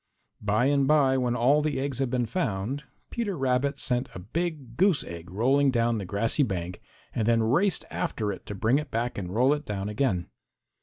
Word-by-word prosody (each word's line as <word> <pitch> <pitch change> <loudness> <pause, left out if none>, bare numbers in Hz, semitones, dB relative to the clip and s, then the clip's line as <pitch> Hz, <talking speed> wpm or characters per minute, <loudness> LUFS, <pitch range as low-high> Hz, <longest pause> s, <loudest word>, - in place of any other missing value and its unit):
By 105 +4 +2
and 140 -1 +3
by, 140 -3 +4
when 125 -1 0
all 135 +5 +4
the 150 -2 -1
eggs 135 -1 -2
had 135 -2 0
been 125 -1 0
found, 130 - -2 0.3
Peter 205 -6 -2
Rabbit 135 +1 +1
sent 125 -1 -1
a - - -5
big 140 - -4
goose 185 -2 +3
egg 85 0 -8
rolling 135 +8 +3
down 115 -2 +1
the 100 - -5
grassy 100 - 0
bank 90 -7 -2 0.3
and 110 -2 -1
then 115 -1 +3
raced 165 - +2
after 105 -2 -2
it 95 - -9
to 105 - -5
bring 115 +7 +2
it 150 -1 -6
back 120 -1 -2
and 90 -3 -5
roll 130 +5 +4
it 150 0 -3
down 100 -4 -4
again. 105 -6 0
125 Hz, 200 wpm, -27 LUFS, 105-140 Hz, 0.3 s, by